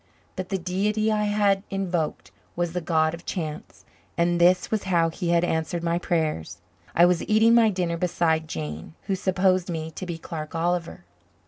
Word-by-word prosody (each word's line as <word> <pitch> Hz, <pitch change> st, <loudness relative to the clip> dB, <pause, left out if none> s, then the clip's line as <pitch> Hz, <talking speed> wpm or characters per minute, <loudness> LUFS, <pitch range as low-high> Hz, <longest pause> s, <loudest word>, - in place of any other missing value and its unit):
But 185 Hz, -1 st, -5 dB
the 195 Hz, -, 0 dB
deity 205 Hz, +4 st, 0 dB
I 210 Hz, -1 st, +1 dB
had 205 Hz, -2 st, +2 dB
invoked 180 Hz, -5 st, -2 dB, 0.2 s
was 175 Hz, -1 st, -1 dB
the 180 Hz, -, -2 dB
god 160 Hz, -1 st, +1 dB
of 170 Hz, +1 st, -8 dB
chance 155 Hz, -4 st, -6 dB, 0.3 s
and 175 Hz, 0 st, +2 dB
this 180 Hz, +1 st, +4 dB
was 215 Hz, -3 st, -1 dB
how 170 Hz, -3 st, +2 dB
he 175 Hz, +1 st, -3 dB
had 170 Hz, 0 st, +3 dB
answered 165 Hz, 0 st, -1 dB
my 170 Hz, 0 st, 0 dB
prayers. 160 Hz, -, -1 dB, 0.4 s
I 170 Hz, -, +7 dB
was 175 Hz, -1 st, +2 dB
eating 220 Hz, +2 st, +5 dB
my 230 Hz, -2 st, +6 dB
dinner 180 Hz, -4 st, -1 dB
beside 165 Hz, -2 st, 0 dB
Jane, 80 Hz, -, -6 dB
who 195 Hz, -, -2 dB
supposed 185 Hz, -1 st, +1 dB
me 160 Hz, -1 st, -4 dB
to 185 Hz, -, -7 dB
be 170 Hz, -2 st, -4 dB
Clark 160 Hz, -1 st, -7 dB
Oliver! 170 Hz, +1 st, -1 dB
175 Hz, 180 wpm, -25 LUFS, 165-190 Hz, 0.4 s, I